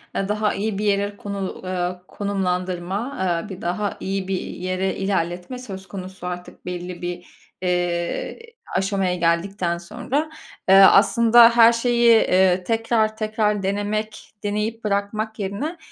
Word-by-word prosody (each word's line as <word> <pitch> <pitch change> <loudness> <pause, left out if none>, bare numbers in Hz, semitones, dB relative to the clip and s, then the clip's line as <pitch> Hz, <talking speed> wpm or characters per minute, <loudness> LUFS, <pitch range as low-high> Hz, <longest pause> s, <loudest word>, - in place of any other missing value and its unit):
eee, 195 - -1
daha 210 0 0
iyi 210 0 -2
bir 210 - -2
yere 205 0 0
konu 200 -2 -5
eee, 180 -1 -3
konumlandırma, 190 +3 -2 0.3
eee, 210 - -10
bir 190 0 -8
daha 200 +4 -2
iyi 195 -1 -3
bir 190 -1 -1
yere 185 +1 -3
ilerletme 185 +3 -2
söz 195 -6 -8
konusu 185 -1 -8
artık 180 0 -8
belli 180 0 -6
bir, 175 0 -5 0.4
eee, 175 -1 -1 0.4
aşamaya 190 -1 0
geldikten 170 +1 0
sonra. 245 - -3 0.4
Eee, 190 - +8
aslında 230 +4 +7
her 230 0 +8
şeyi, 240 0 +1
eee, 185 -4 +4
tekrar 225 +1 0
tekrar 215 -2 0
denemek, 210 +2 -3
deneyip 210 +2 -2
bırakmak 215 +2 -2
yerine, 205 - -3
195 Hz, 130 wpm, -22 LUFS, 180-215 Hz, 0.4 s, Eee